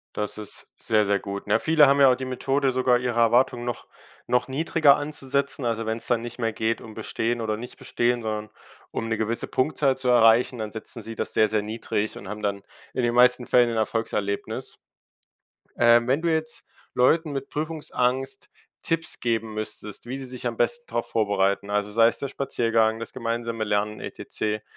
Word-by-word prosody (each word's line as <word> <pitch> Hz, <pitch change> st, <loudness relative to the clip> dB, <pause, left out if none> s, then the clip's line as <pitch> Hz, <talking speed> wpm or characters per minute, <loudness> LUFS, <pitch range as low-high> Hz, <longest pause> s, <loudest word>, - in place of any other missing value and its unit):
Das 105 Hz, 0 st, -3 dB
ist 105 Hz, -1 st, -9 dB
sehr, 110 Hz, -2 st, +2 dB
sehr 100 Hz, 0 st, +2 dB
gut. 100 Hz, +1 st, -6 dB
Na -, -, +3 dB
ja, -, -, +3 dB
viele 155 Hz, 0 st, +5 dB
haben 140 Hz, +1 st, +4 dB
ja 135 Hz, -2 st, +7 dB
auch -, -, +3 dB
die 130 Hz, +1 st, -5 dB
Methode 135 Hz, +1 st, 0 dB
sogar, 125 Hz, -1 st, +2 dB
ihre 125 Hz, -2 st, -1 dB
Erwartungen 120 Hz, +1 st, +3 dB
noch 120 Hz, -1 st, -5 dB, 0.4 s
noch 125 Hz, 0 st, +1 dB
niedriger 145 Hz, +1 st, +4 dB
anzusetzen, 140 Hz, -2 st, -2 dB
also 115 Hz, -1 st, -1 dB
wenn's 110 Hz, +1 st, -2 dB
dann 120 Hz, -2 st, +1 dB
nicht 120 Hz, +1 st, -7 dB
mehr 115 Hz, -2 st, 0 dB
geht, 110 Hz, +1 st, -1 dB
um 110 Hz, -, -11 dB
bestehen 115 Hz, +2 st, -2 dB
oder 110 Hz, -1 st, -1 dB
nicht 120 Hz, +3 st, -8 dB
bestehen, 120 Hz, 0 st, 0 dB
sondern 110 Hz, -1 st, -4 dB, 0.4 s
um 115 Hz, -, -3 dB
'ne 115 Hz, -, 0 dB
gewisse 110 Hz, +2 st, -2 dB
Punktzahl 135 Hz, 0 st, +1 dB
zu 130 Hz, -1 st, -3 dB
erreichen, 120 Hz, 0 st, +5 dB
dann 110 Hz, -1 st, -4 dB
setzen 110 Hz, +1 st, -5 dB
sie 115 Hz, +1 st, -7 dB
das -, -, -3 dB
sehr, 110 Hz, -1 st, +4 dB
sehr 110 Hz, -1 st, +1 dB
niedrig 110 Hz, 0 st, -3 dB
und 95 Hz, -, -9 dB
haben 105 Hz, 0 st, -6 dB
dann 100 Hz, -1 st, -2 dB, 0.3 s
in 130 Hz, -, -1 dB
den 120 Hz, 0 st, +1 dB
meisten 125 Hz, 0 st, +5 dB
Fällen 120 Hz, -1 st, +4 dB
ein -, -, -3 dB
Erfolgserlebnis. 105 Hz, -2 st, -2 dB, 1.0 s
Ähm, 120 Hz, 0 st, +5 dB
wenn 135 Hz, +5 st, +2 dB
du 170 Hz, -1 st, +1 dB
jetzt 160 Hz, 0 st, -2 dB, 0.3 s
Leuten 155 Hz, +5 st, +3 dB
mit 135 Hz, 0 st, -4 dB
Prüfungsangst 135 Hz, -4 st, -2 dB, 0.3 s
Tipps 165 Hz, -1 st, -1 dB
geben 115 Hz, -2 st, -1 dB
müsstest, 105 Hz, -1 st, -5 dB
wie 125 Hz, +2 st, -5 dB
sie 135 Hz, -, -6 dB
sich 125 Hz, -1 st, -5 dB
am 120 Hz, -, -3 dB
besten 480 Hz, -, -1 dB
drauf -, -, -1 dB
vorbereiten, 100 Hz, -2 st, +1 dB
also 105 Hz, 0 st, -1 dB
sei 115 Hz, +2 st, +5 dB
es 115 Hz, 0 st, 0 dB
der 140 Hz, -, -4 dB
Spaziergang, 115 Hz, -5 st, +1 dB
das 115 Hz, -, -6 dB
gemeinsame 115 Hz, -2 st, -3 dB
Lernen 105 Hz, 0 st, -1 dB
etcc, 105 Hz, 0 st, -4 dB
120 Hz, 195 wpm, -25 LUFS, 110-130 Hz, 1.0 s, ja